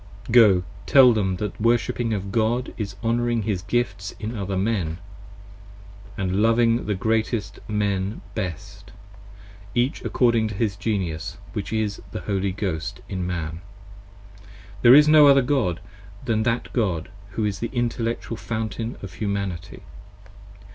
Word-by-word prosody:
Go, 105 -6 +6 0.2
tell 130 -4 +7
them 95 -4 0
that 105 +2 -4
the - - -12
Worship 120 +2 +1
of 105 -5 -2
God, 115 +4 0
is 100 -3 -5
honouring 120 0 +1
his 100 -4 -1
gifts 100 -3 -2
In 110 +2 -4
other 100 -2 -3
men: 95 -6 -1 0.7
& 100 0 -18
loving 115 +5 +2
the 105 - 0
greatest 110 +1 -1
men 100 -1 -1
best, 90 -7 -6 0.8
each 125 +3 0
according 115 -3 +2
To 105 - -6
his 105 -1 0
Genius, 95 -6 -3 0.2
which - - -4
is 110 -2 -1
the - - -4
Holy 100 -1 -1
Ghost 95 -1 -4
in 95 -3 -3
Man; 85 -1 -4 1.2
there 120 +1 +9
is 150 +1 +7
no 150 -1 +8
other 140 -1 +7
10 - - -4
God, 125 - +1 0.5
than 110 -3 +1
that 115 +2 -1
God 95 -9 -1 0.2
who 110 +2 -1
is 100 -2 -2
the 115 - -3
intellectual 115 -2 -2
fountain 110 +1 -4
of 100 - -7
Humanity. 100 -5 -4
105 Hz, 140 wpm, -24 LUFS, 95-115 Hz, 1.2 s, there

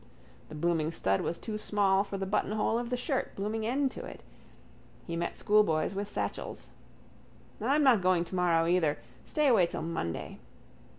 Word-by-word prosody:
The 155 - -8
blooming 160 0 0
stud 95 - 0
was 170 - -2
too 215 -2 -5
small 200 -2 +2
for 200 -1 -5
the 195 - -2
buttonhole 215 +3 0
of 240 0 -4
the 250 - -1
shirt, 265 +1 -2
blooming 215 +2 -2
end 270 +2 +1
to - - -7
it. - - -10 0.8
He 170 - -4
met 170 +1 -3
schoolboys 200 -6 +2
with 200 +1 -3
satchels. - - -5 0.9
I'm 290 +2 +2
not 250 -7 +5
going 180 -2 +2
tomorrow 175 -2 +2
either, 170 -3 +2 0.3
stay 300 - 0
away 225 -10 +5
till - - -5
Monday. 165 - -4
195 Hz, 165 wpm, -30 LUFS, 170-220 Hz, 0.9 s, not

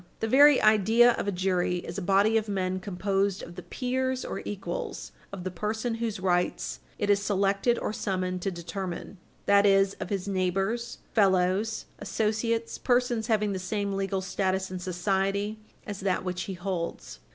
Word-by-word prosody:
The 225 - -1
very 285 +4 +7
idea 220 +3 +6
of 215 - -3
a - - +2
jury 180 -1 0
is 175 +3 -5
a - - -5
body 200 +4 +3
of 220 -1 +1
men 185 -2 -1
composed 195 +1 -1
of 170 - -9
the 180 - -8
peers 260 +4 -2
or - - -4
equals 185 -4 -5 0.2
of 190 -3 -6
the 185 - -3
person 220 +6 -2
whose 225 -3 -3
rights 180 -1 0 0.2
it 205 0 +1
is 200 0 +3
selected 200 +3 +1
or - - -2
summoned 185 -3 -2
to 195 - 0
determine 180 +1 -6 0.3
that 200 0 +5
is, 195 -1 +4
of - - -5
his 195 -1 -2
neighbors, 195 +5 -1 0.2
fellows, 195 +1 +2
associates, 220 +3 -1
persons 245 -3 +1
having 210 -3 +1
the 190 - -3
same 200 +1 -2
legal 195 0 -1
status 190 0 -1
in 185 - -4
society 195 +3 -1 0.3
as 205 -2 -5
that 190 -2 0
which 180 0 -3
he 190 - -3
holds. 175 - -4
195 Hz, 170 wpm, -28 LUFS, 185-215 Hz, 0.3 s, very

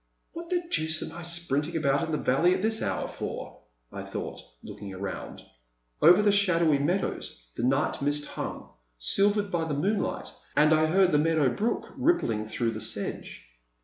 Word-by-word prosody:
"What 335 0 -8
the 355 -1 0
deuce 160 0 +1
am - - -7
I 170 - -7
sprinting 170 -2 0
about 155 +2 +1
the 155 - 0
valley 165 +9 +3
at 185 - -4
this 220 0 +1
hour - - -1
for?*' - - -6 0.3
I - - -6
thought, - - -6 0.2
looking 100 -2 -8
around. 95 0 -6 0.6
Over 180 +6 +7
the 205 - +5
shadowy 170 -7 +3
meadows 145 - -2
the - - -4
night 135 +5 +1
mist 145 +1 0
hung, - - -6 0.3
silvered 200 - +2
by 165 -2 0
tiie 150 -3 -2
moonlight, 200 +6 -1 0.3
and 150 +1 +5
I 155 0 +4
heard 185 +2 +4
the 150 - +4
meadow 155 -3 +3
brook 220 - -1
rippling 120 - +1
through 115 +1 -1
the - - -6
sedge. - - -4
160 Hz, 170 wpm, -27 LUFS, 140-195 Hz, 0.6 s, Over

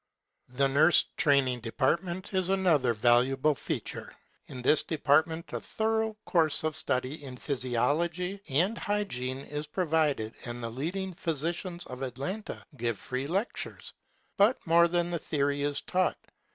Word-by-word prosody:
The 130 +3 +1
nurse 155 +5 +5
training 135 -4 +3
department 170 - -1
is 185 -1 +1
another 175 -10 +3
valuable 125 +6 +3
feature. - - -5 0.4
In 125 -1 -8
this 150 - +4
department 160 +2 +1
a - - -1
thor 220 0 0
ough 220 -1 -4
course 160 -5 +2
of 155 -1 0
study 130 +4 -2
in 130 -2 -8
physiology 160 +9 -1
and 180 - +1
hygiene 130 - -2
is 150 +1 -5
provided 150 -8 0
and 120 0 -6
the 115 - -3
leading 180 +9 -3
physi 165 -3 -1
cians 175 0 -6
of 125 0 -8
Atlanta 135 - -5
give 115 -2 -1
free 130 +7 -4
lectures. 195 +9 -3 0.4
But 210 +6 +3
more 170 +1 +5
than 175 0 0
the 170 - -1
theory 145 -1 -1
is 145 0 0
taught. 185 0 0
155 Hz, 145 wpm, -29 LUFS, 130-175 Hz, 0.4 s, nurse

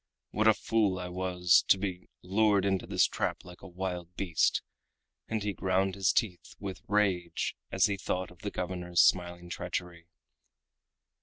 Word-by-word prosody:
"What 110 +1 +2
a 110 - +6
fool 105 -5 +1
I 90 -1 -5
was 90 0 +3
to - - +6
be 95 -2 -5
lured 100 +1 +3
into 95 -1 0
this - - +3
trap - - -2
like 90 -1 -12
a - - -10
wild 90 -1 -5
beast!" 90 -4 +1 0.6
and 110 -2 -2
he 105 -1 -1
ground 95 +1 0
his 95 -1 +2
teeth 100 -7 -2
with 95 -2 -6
rage 95 -5 0 0.2
as - - +4
he 100 -1 0
thought 95 -1 -3
of 90 - -17
the 105 -1 -4
governor's 90 -2 -3
smiling 90 -1 +2
treachery. 85 -1 -5
95 Hz, 160 wpm, -30 LUFS, 90-100 Hz, 0.6 s, a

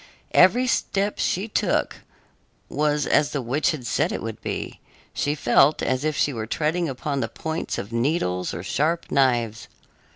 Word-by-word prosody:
] - - -37 0.2
Every 245 +6 -1
step 205 -4 0
she 190 +5 0
took 215 - 0 0.7
was 150 -1 0
as 150 -1 +3
the 140 - -1
witch 130 +6 +1
had 140 -6 -3
said 115 - 0
it - - -4
would 110 -1 -6
be; - - -5 0.3
she 145 +1 -1
felt 135 +2 +3
as 130 +1 0
if 155 -1 0
she 145 - +1
were 110 -2 -4
treading 160 +6 0
upon 140 +2 -3
the 115 -3 -2
points 160 +6 -4
of 100 +4 -6
needles 115 - 0
or 85 - -6
sharp 160 - -1
knives. 120 -4 +1
145 Hz, 170 wpm, -24 LUFS, 120-155 Hz, 0.7 s, as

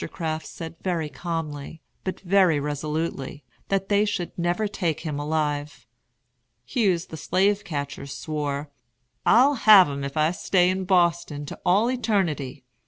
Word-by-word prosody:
Crafts 160 -2 -4
said 165 -1 -8
very 170 -5 -1
calmly, 160 -2 -5 0.2
but 185 - -4
very 185 -4 +3
resolutely, 150 -1 -3 0.3
that 195 -1 0
they 205 0 +3
should 195 -4 -3
never 175 +5 0
take 170 -6 -2
him 150 -3 -4
alive. 150 -1 -2 0.8
Hughes 185 - +1
the 160 - -9
slave 195 +6 +1
catcher 145 -6 -5
swore: 145 0 -4 0.6
"I'll 255 +6 +6
have 210 - +7
'em 140 0 -4
if 140 +2 -5
I 155 +1 +3
stay 180 0 +2
in 190 0 -2
Boston 170 -5 +1
to - - -8
all 210 +7 +3
eternity. 170 - -1
165 Hz, 140 wpm, -25 LUFS, 150-190 Hz, 0.8 s, have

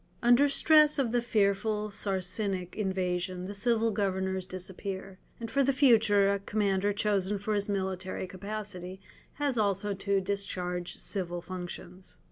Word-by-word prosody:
Under 245 +4 +5
stress 305 +1 +5
of 260 -5 +1
the 240 0 +2
fearful 210 -1 0
Saracenic 190 -1 -2
invasion 185 -2 -2
the 200 - -5
civil 225 +2 +1
governors 190 -2 -1
disappear, 190 +1 -5 0.2
and 230 -1 -6
for 275 +1 +3
the 275 - +3
future 220 -7 +4
a 200 - -1
commander 200 -1 0
chosen 205 -1 0
for 205 +2 -2
his 205 0 -1
military 190 -1 -2
capacity 190 -1 -6 0.3
has 280 -5 -1
also 200 0 +1
to 200 0 0
discharge 185 -2 -3
civil 175 -3 -3
functions. 180 +1 -8
200 Hz, 135 wpm, -29 LUFS, 185-215 Hz, 0.3 s, Under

